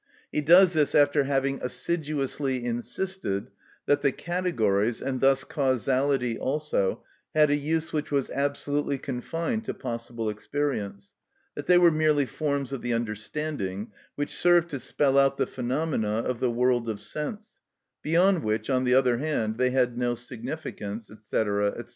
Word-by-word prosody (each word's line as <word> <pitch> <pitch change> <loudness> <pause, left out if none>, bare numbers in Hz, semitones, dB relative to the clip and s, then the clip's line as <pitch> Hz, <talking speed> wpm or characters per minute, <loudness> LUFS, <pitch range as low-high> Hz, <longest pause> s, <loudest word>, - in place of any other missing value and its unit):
He - - 0
does 175 +4 +7
this 150 -3 +2
after 145 -1 +4
having 135 0 0
assiduously 140 -3 -2
insisted 120 - -3 0.3
that 145 0 +2
the 140 - +3
categories, 120 - 0
and 130 -1 -3
thus 135 0 +4
causality 130 -2 0
also, 140 -8 -1 0.3
had 150 -1 +5
a - - +4
use 155 +2 -1
which 150 -1 -2
was 140 -3 0
absolutely 145 0 -1
confined 165 - -3
to - - -4
possible 115 -2 -5
experience; 105 -3 -3 0.4
that - - -7
they 180 - +6
were 175 -1 +6
merely 155 -2 +2
forms 140 -1 -2
of 135 - -4
the 120 -1 -1
understanding, 110 -1 -4 0.2
which 145 0 -3
served 175 -1 +4
to 140 - -4
spell 140 +1 +2
out 135 0 +3
the - - +1
phenomena 125 -4 -1
of 125 0 -3
the 125 - +1
world 120 0 +1
of 105 -2 -3
sense, 150 - -6 0.4
beyond 175 +2 +3
which, 110 +5 -1
on 130 0 +2
the 125 0 +4
other 125 -3 +3
hand, 120 -7 -1
they 125 0 +3
had 125 -2 +1
no 120 -1 0
significance, 120 -3 -6
&c., 110 - -12
&c. - - +2
135 Hz, 155 wpm, -27 LUFS, 120-150 Hz, 0.4 s, does